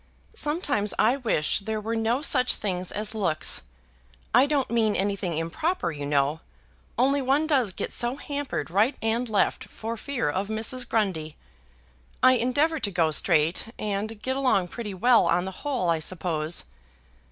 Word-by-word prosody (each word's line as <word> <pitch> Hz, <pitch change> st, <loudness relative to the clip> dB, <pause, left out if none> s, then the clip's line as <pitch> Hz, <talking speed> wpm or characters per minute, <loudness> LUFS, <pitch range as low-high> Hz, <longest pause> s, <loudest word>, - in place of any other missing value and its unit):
Sometimes 295 Hz, -, -1 dB
I 235 Hz, +5 st, +3 dB
wish 220 Hz, -, +1 dB
there 215 Hz, +1 st, -3 dB
were 225 Hz, +2 st, -3 dB
no 230 Hz, +5 st, 0 dB
such 255 Hz, -5 st, +4 dB
things 185 Hz, -3 st, -2 dB
as 210 Hz, +1 st, -2 dB
looks. 160 Hz, -, 0 dB, 0.7 s
I 250 Hz, +4 st, +6 dB
don't 285 Hz, -4 st, 0 dB
mean 220 Hz, -3 st, +2 dB
anything 195 Hz, -4 st, -1 dB
improper, 175 Hz, -, -1 dB
you 145 Hz, -2 st, -5 dB
know; 145 Hz, +2 st, +1 dB, 0.6 s
only 275 Hz, +3 st, +3 dB
one 275 Hz, +4 st, +2 dB
does 265 Hz, -10 st, +2 dB
get -, -, -5 dB
so 240 Hz, +2 st, 0 dB
hampered, 285 Hz, -, -4 dB
right 215 Hz, +9 st, +2 dB
and 230 Hz, +2 st, 0 dB
left, 210 Hz, -2 st, +1 dB
for 225 Hz, +1 st, -6 dB
fear 255 Hz, -, -3 dB
of 190 Hz, +7 st, -1 dB
Mrs. 225 Hz, +3 st, -1 dB
Grundy. 180 Hz, -9 st, -1 dB, 0.9 s
I 255 Hz, -, +8 dB
endeavour 285 Hz, +7 st, +1 dB
to 205 Hz, -, -1 dB
go 170 Hz, -4 st, +1 dB
straight, 160 Hz, +1 st, +2 dB
and 210 Hz, +1 st, -3 dB
get 260 Hz, 0 st, -1 dB
along 250 Hz, -10 st, +1 dB
pretty 210 Hz, -3 st, -6 dB
well 240 Hz, +5 st, +4 dB
on 175 Hz, +2 st, +2 dB
the 190 Hz, -, -4 dB
whole, 255 Hz, -, 0 dB
I 165 Hz, -, +1 dB
suppose. 160 Hz, -1 st, -2 dB
220 Hz, 160 wpm, -26 LUFS, 180-255 Hz, 0.9 s, I